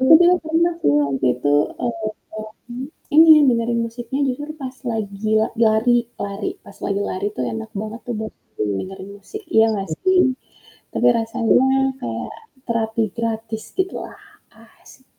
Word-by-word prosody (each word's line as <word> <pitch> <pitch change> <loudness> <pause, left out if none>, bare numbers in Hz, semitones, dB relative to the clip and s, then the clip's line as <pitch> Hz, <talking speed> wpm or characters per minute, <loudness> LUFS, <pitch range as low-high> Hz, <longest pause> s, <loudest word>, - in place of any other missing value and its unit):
Aku 260 +4 +5
bilang 355 0 +5
pernah 330 +2 +1
tuh 145 - +4
waktu 135 -1 -1
itu, 145 +3 +1 0.3
eee, 225 -3 -2 1.1
ini, 320 +1 +9 0.2
dengerin 235 0 +1
musiknya 240 +4 -5
jujur 290 +4 -4
pas 260 -1 -5 0.2
lagi 215 -1 -2
la 220 - +1 0.2
lari 220 +3 +4 0.3
lari, 200 0 -3
pas - - -13
lagi 200 - 0
lari 185 +2 -2
tuh - - -1
enak 225 0 -5
banget 220 +2 -6 0.2
buat 220 0 -5 0.5
dengerin 190 +1 -7
musik, 420 - -9
iya 220 - +7
nggak 195 -2 -3
sih? 375 -1 +4 0.7
Tapi - - +2
rasanya 225 +3 +2 0.4
kayak 115 -1 -4 0.3
terapi 225 -1 0
gratis 225 -1 -3
gitu 375 0 0
lah, - - -13 0.6
asik. 260 - -18
225 Hz, 140 wpm, -21 LUFS, 215-260 Hz, 1.1 s, ini